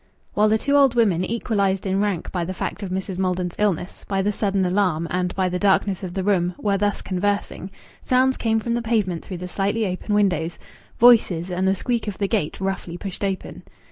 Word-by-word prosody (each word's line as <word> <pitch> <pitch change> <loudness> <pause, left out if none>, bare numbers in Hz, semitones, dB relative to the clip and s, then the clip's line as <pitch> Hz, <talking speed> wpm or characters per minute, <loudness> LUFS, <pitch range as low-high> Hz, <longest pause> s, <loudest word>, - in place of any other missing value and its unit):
While 210 +1 +3
the 220 - +4
two 280 +5 0
old 275 -4 +5
women, 200 -7 +3
equalized 200 -3 0
in 190 +1 +1
rank 200 -5 -2
by 180 -2 -1
the 185 +2 -4
fact 205 - -4
of 195 - -4
Mrs. 190 0 -4
Maldon's 180 -2 -1
illness, 195 -4 -1
by 195 -1 0
the 205 - +1
sudden 195 -2 0
alarm, 180 -3 +1
and 180 0 -1
by 190 -1 +1
the 180 0 -2
darkness 195 -1 +2
of 180 -2 -6
the 190 - -1
room, 180 -3 +1
were 200 -2 0
thus 205 0 0
conversing, 200 0 -2 0.3
sounds 260 +1 +2
came 225 -1 +1
from 235 +1 -2
the 240 - 0
pavement 210 -7 0
through 185 - -6
the 180 +1 -6
slightly 200 +4 -1
open 190 +2 -2
windows 175 -5 +1 0.4
voices, 195 -7 +5
and 185 +1 0
the 190 - +3
squeak 235 +2 -1
of 205 - -4
the 200 - 0
gate 195 -8 -1
roughly 190 -2 -3
pushed 195 +1 -6
open. 195 -1 -3
195 Hz, 210 wpm, -23 LUFS, 180-210 Hz, 0.4 s, old